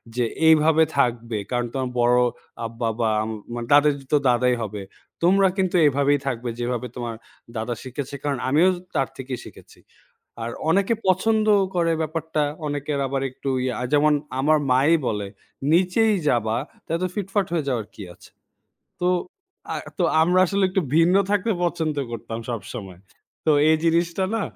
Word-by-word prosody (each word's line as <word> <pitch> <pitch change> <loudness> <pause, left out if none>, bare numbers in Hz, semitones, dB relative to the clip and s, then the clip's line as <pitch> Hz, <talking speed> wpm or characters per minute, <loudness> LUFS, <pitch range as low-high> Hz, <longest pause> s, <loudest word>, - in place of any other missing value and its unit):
যে, 125 -1 +1 0.2
এইভাবে 160 0 +5
থাকবে। 120 -4 0
কারণ 120 -1 0
তোমার 130 -2 -2
বড় 120 +1 +4 0.5
আব্বা 115 0 -3
বা 115 - +2
উম 110 - -4 0.3
মানে 120 -1 -5
তাদেরই 145 -2 +4
তো - - +7
দাদাই 125 0 +3
হবে। 105 -2 -5 0.4
তোমরা 195 +3 +5
কিন্তু 185 -1 0
এইভাবেই 145 0 +3
থাকবে, 120 -2 -2
যেভাবে 125 +1 -2
তোমার 120 -2 -4 0.4
দাদা 110 +2 -2
শিখিয়েছি 130 +2 -6
কারণ 145 -2 -1
আমিও 155 +6 +4
তো 175 - -10
তার 135 - +1
থেকেই 130 -2 -5
শিখেছি। - - -15 0.6
আর 115 - -3 0.2
অনেকে 200 +6 +2
পছন্দ 215 +4 +2 0.3
করে 170 -1 +2
ব্যাপারটা। 160 0 -2 0.2
অনেকের 145 0 -2
আবার 135 0 -2
একটু 135 - -7 0.2
ইয়া। 130 -1 -1 0.2
যেমন, 150 +1 +4 0.3
আমার 155 +3 +4
মায়েই 140 +6 +4
বলে, 105 -2 -2 0.4
"নিচেই 190 +6 +3
যাবা, 115 -3 +1 0.3
তো - - -40
এত 180 - -2
ফিটফাট 200 -1 -1
হয়ে 160 -4 -1
যাওয়ার 115 -5 -1
কী - - -9
আছে?" - - -18 0.7
তো 180 - +2 0.6
আ - - -2 0.2
তো 180 - +2 0.2
আমরা 180 +3 +3
আসলে 195 +2 +1
একটু 190 +1 0 0.2
ভিন্ন 165 +2 +5 0.2
থাকতে 205 +2 +1
পছন্দ 160 -3 -1
করতাম 115 -1 -6
সবসময়। 100 -5 -7 0.5
তো - - +5 0.2
এই 160 - +5
জিনিসটা 170 +2 +1
না 225 - 0
145 Hz, 160 wpm, -23 LUFS, 120-170 Hz, 0.7 s, তো